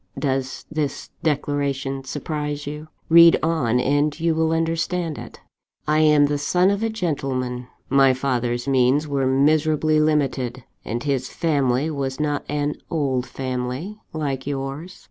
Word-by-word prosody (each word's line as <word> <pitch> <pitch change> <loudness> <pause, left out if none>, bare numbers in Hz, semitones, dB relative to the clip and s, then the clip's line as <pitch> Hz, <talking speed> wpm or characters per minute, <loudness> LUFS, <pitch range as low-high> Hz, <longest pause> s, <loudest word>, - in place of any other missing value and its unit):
"Does 130 -2 -2
this 155 -2 -3
declaration 140 -3 -1
surprise 150 +1 -4
you? 150 +2 -6 0.2
Read 170 0 +8
on, 135 -8 +1
and 145 +4 +1
you 165 0 +2
will 160 0 +1
understand 165 0 -1
it. - - -10 0.5
"I 155 +1 +3
am 150 -2 +5
the 145 0 -1
son 180 +6 +2
of 200 +1 -1
a 225 - 0
gentleman. 135 - -2 0.2
My 135 -1 +4
father's 125 -2 -1
means 135 +3 +3
were 140 -2 0
miserably 155 +3 +3
limited, 135 -5 0 0.2
and 120 +3 -4
his 135 -3 -1
family 140 -2 0
was 135 -2 -3
not 145 -1 -1
an 145 0 -1
old 135 -6 -1
family, 130 +10 -4
like 140 -4 -3
yours. 140 +5 -5
145 Hz, 140 wpm, -22 LUFS, 130-155 Hz, 0.5 s, Read